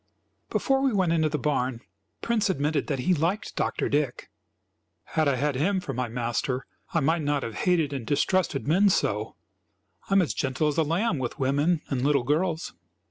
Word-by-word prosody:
Before 270 Hz, 0 st, +1 dB
we 270 Hz, -1 st, +2 dB
went 185 Hz, -4 st, +2 dB
into 160 Hz, -2 st, +2 dB
the 150 Hz, -, -1 dB
barn, 130 Hz, -4 st, -1 dB, 0.4 s
Prince 220 Hz, -3 st, +1 dB
admitted 150 Hz, -3 st, 0 dB
that 140 Hz, -, -1 dB
he 180 Hz, +8 st, +2 dB
liked 175 Hz, +6 st, -1 dB
Dr. -, -, -1 dB
Dick. 145 Hz, -4 st, -1 dB, 0.8 s
"Had 155 Hz, -2 st, +2 dB
I 140 Hz, -, +3 dB
had 145 Hz, +3 st, 0 dB
him 190 Hz, +9 st, +1 dB
for 140 Hz, -7 st, -5 dB
my 125 Hz, 0 st, -2 dB
master 120 Hz, +2 st, -2 dB, 0.3 s
I 165 Hz, -, +1 dB
might 160 Hz, +4 st, +2 dB
not 145 Hz, -1 st, 0 dB
have 115 Hz, -, -4 dB
hated 160 Hz, -, +1 dB
and 135 Hz, -4 st, -3 dB
distrusted 150 Hz, 0 st, +1 dB
men 190 Hz, +7 st, +4 dB
so. 190 Hz, -, 0 dB, 0.7 s
I -, -, +1 dB
am 195 Hz, -, +6 dB
as 160 Hz, -, -2 dB
gentle 135 Hz, +3 st, 0 dB
as 150 Hz, -, -1 dB
a -, -, +4 dB
lamb 165 Hz, +2 st, 0 dB
with 125 Hz, -2 st, -4 dB
women 145 Hz, +5 st, +1 dB
and 135 Hz, -3 st, -1 dB
little 140 Hz, -1 st, +2 dB
girls." 160 Hz, +5 st, -1 dB
150 Hz, 190 wpm, -26 LUFS, 135-175 Hz, 0.8 s, am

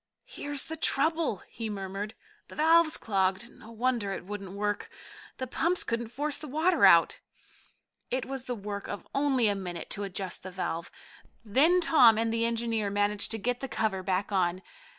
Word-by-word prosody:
"Here's 290 Hz, -, -3 dB
the 320 Hz, -, -6 dB
trouble!" 315 Hz, -, +1 dB
he 225 Hz, -1 st, -6 dB
murmured. 200 Hz, +2 st, -5 dB, 0.3 s
"The -, -, -12 dB
valve's 320 Hz, +1 st, +4 dB
clogged. 195 Hz, +2 st, 0 dB
No 220 Hz, -, -15 dB
wonder 230 Hz, -3 st, -1 dB
it 185 Hz, -, -7 dB
wouldn't 195 Hz, -1 st, -7 dB
work. 205 Hz, 0 st, -2 dB, 0.5 s
The 260 Hz, -, -3 dB
pumps 340 Hz, +8 st, +1 dB
couldn't 235 Hz, 0 st, -2 dB
force 285 Hz, +5 st, -2 dB
the 305 Hz, -, -7 dB
water 315 Hz, +7 st, +3 dB
out." -, -, +5 dB, 0.9 s
It 255 Hz, 0 st, -1 dB
was 265 Hz, -1 st, -6 dB
the 250 Hz, -, -3 dB
work 200 Hz, -1 st, -6 dB
of -, -, -7 dB
only 270 Hz, -4 st, +2 dB
a 205 Hz, -, +3 dB
minute 180 Hz, -4 st, -6 dB
to 205 Hz, -, -2 dB
adjust 190 Hz, -2 st, -4 dB
the 190 Hz, -, -7 dB
valve. 180 Hz, -2 st, -4 dB, 0.6 s
Then 310 Hz, -, +4 dB
Tom 250 Hz, -10 st, +6 dB
and 225 Hz, 0 st, 0 dB
the 230 Hz, 0 st, +1 dB
engineer 230 Hz, -2 st, -1 dB
managed 205 Hz, 0 st, +2 dB
to 225 Hz, -, -2 dB
get 245 Hz, +3 st, -1 dB
the 270 Hz, -, -4 dB
cover 220 Hz, -5 st, -1 dB
back 190 Hz, +2 st, -1 dB
on. 185 Hz, -1 st, 0 dB
225 Hz, 175 wpm, -29 LUFS, 200-270 Hz, 0.9 s, Tom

